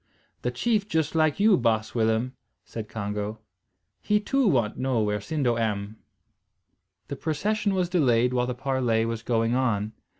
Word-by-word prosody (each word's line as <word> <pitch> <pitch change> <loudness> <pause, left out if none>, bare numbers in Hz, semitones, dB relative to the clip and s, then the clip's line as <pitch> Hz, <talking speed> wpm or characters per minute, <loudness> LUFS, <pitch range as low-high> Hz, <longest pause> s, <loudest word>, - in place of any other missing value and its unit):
"The 125 - -1
chief 205 - 0
just 160 -5 0
like 155 -1 +2
you, 210 -1 +5
baas 110 -3 0
Willem," 115 +2 +1 0.3
said 110 -2 -7
Congo. 105 0 -4 0.6
"He 210 - +2
too 270 +4 +1
want 120 - +2
know 130 -2 0
where 105 0 0
Sindo 125 0 0
am." 105 -1 -2 1.1
The 140 - -4
procession 200 +8 -1
was 180 -1 +1
delayed 125 -8 +2
while 125 -1 +1
the 125 - -3
parley 125 -4 0
was 115 -1 -3
going 115 0 0
on. 110 -5 0
125 Hz, 155 wpm, -26 LUFS, 110-160 Hz, 1.1 s, you